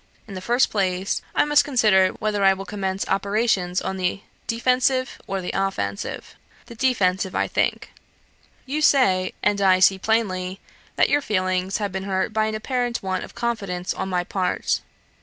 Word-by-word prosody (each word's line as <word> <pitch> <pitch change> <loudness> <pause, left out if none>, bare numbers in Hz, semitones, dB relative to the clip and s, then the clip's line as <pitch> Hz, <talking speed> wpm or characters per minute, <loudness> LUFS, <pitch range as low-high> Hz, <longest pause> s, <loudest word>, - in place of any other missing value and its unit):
In 200 - -9
the 185 - -6
first 240 +6 +2
place, 190 -2 0
I - - +4
must 295 0 +4
consider 215 -9 +4
whether 210 -2 -1
I 195 0 +6
will 195 0 -7
commence 195 -1 -3
operations 195 -2 0
on 190 - -3
the 185 +1 -1 0.3
defensive, 255 +2 +1
or 195 -1 -2
the 180 - -4
offensive. 100 - -3 0.3
The - - -11
defensive, 195 -7 +1
I - - +1
think. - - -1 0.7
You 290 +4 -2
say, 190 -11 +3
and 205 -1 +2
I 190 -1 +5
see 190 +1 +5
plainly, 190 -3 -1 0.4
that - - +3
your 290 - +3
feelings 185 -4 0
have 205 -2 -3
been 190 +1 -4
hurt 190 +2 -1
by 215 0 +1
an 220 - -3
apparent 245 +1 -2
want 185 -1 -2
of - - -11
confidence 200 -7 -2
on 190 - -4
my 180 -1 0
part. 185 0 -1
195 Hz, 170 wpm, -23 LUFS, 185-230 Hz, 0.7 s, I